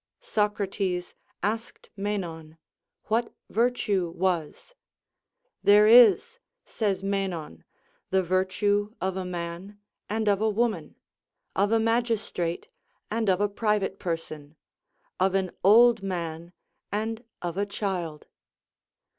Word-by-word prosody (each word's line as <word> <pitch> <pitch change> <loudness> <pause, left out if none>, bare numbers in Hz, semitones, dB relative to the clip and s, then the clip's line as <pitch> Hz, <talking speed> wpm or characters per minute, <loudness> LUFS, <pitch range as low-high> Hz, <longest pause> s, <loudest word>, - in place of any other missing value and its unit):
Socrates 205 - -1 0.3
asked 225 +3 -3
Menon, 170 -6 -4 0.5
"What 230 +2 0 0.2
virtue 215 -6 +1
was." 175 - -2 0.9
"There 205 +1 +7
is," 245 - +6 0.3
says 200 -4 -1
Menon, 190 - -3 0.5
"the 190 0 +2
virtue 205 +4 0
of 190 0 -2
a 190 - -3
man 180 +3 -6 0.3
and 220 +1 -1
of 200 0 +3
a 220 - +3
woman, 215 -6 -1 0.6
of 200 +2 +2
a 225 - +4
magistrate 225 -7 -1 0.4
and 220 -2 0
of 185 -1 +3
a 205 - +2
private 210 -1 -1
person, 155 -3 -5 0.6
of 190 +1 +2
an 190 -2 0
old 230 +3 +6
man 170 -3 -4 0.4
and 220 +2 -2 0.2
of 175 -1 -3
a 200 +1 -1
child." 180 -7 -4
200 Hz, 110 wpm, -27 LUFS, 180-215 Hz, 0.9 s, There